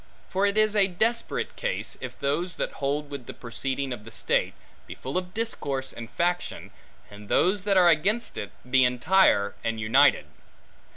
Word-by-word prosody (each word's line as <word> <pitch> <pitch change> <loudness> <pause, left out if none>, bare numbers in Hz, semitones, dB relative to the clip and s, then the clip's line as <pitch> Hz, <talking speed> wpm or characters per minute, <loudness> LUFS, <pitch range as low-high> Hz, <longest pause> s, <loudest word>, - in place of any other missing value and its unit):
For 195 +2 +1
it 200 +1 -1
is 215 0 +3
a 200 -2 +5
desperate 225 +6 -1
case, - - -3
if - - -7
those 165 +6 -1
that - - -2
hold 145 +1 -1
with 140 -4 -7
the - - -8
proceeding 130 +2 -3
of 105 -4 -9
the 115 - -11
state, 115 - 0 0.3
be - - -8
full 130 - -7
of 180 0 -3
discord 140 -12 -3
and 115 0 -8
faction, 175 +6 -2 0.4
and 105 0 -12
those 190 +1 +2
that 200 -2 +3
are 180 -1 +6
against 195 +9 +2
it, 105 - -5 0.2
be 130 +1 +4
entire 125 - +3
and 115 -1 -2
united. 115 - +4
145 Hz, 175 wpm, -26 LUFS, 125-190 Hz, 0.4 s, are